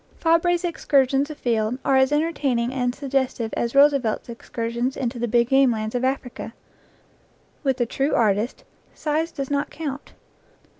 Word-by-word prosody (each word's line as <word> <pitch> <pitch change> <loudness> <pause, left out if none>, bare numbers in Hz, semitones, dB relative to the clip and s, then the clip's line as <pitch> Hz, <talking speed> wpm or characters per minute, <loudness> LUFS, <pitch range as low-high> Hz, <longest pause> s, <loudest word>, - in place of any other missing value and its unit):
Fabre's 335 +2 +2
excursions 280 -4 +1
afield 240 -5 -1
are 270 - +3
as 265 +1 +4
entertaining 285 -6 0
and 245 -1 -1
suggestive 260 -5 -2
as 235 +2 -2
Roosevelt's 275 -6 +3
excursions 235 +2 -3
into 245 -2 -3
the 240 - -1
big 235 +1 +2
game 270 -1 +5
lands 215 -2 -2
of 245 0 -1
Africa. 260 -3 -3 1.1
With 265 -3 +1
the 240 - +1
true 275 +5 -1
artist 215 +1 +1 0.3
size 315 +2 -1
does 275 -3 -5
not 285 +1 0
count. 290 -3 -6
265 Hz, 145 wpm, -23 LUFS, 235-285 Hz, 1.1 s, game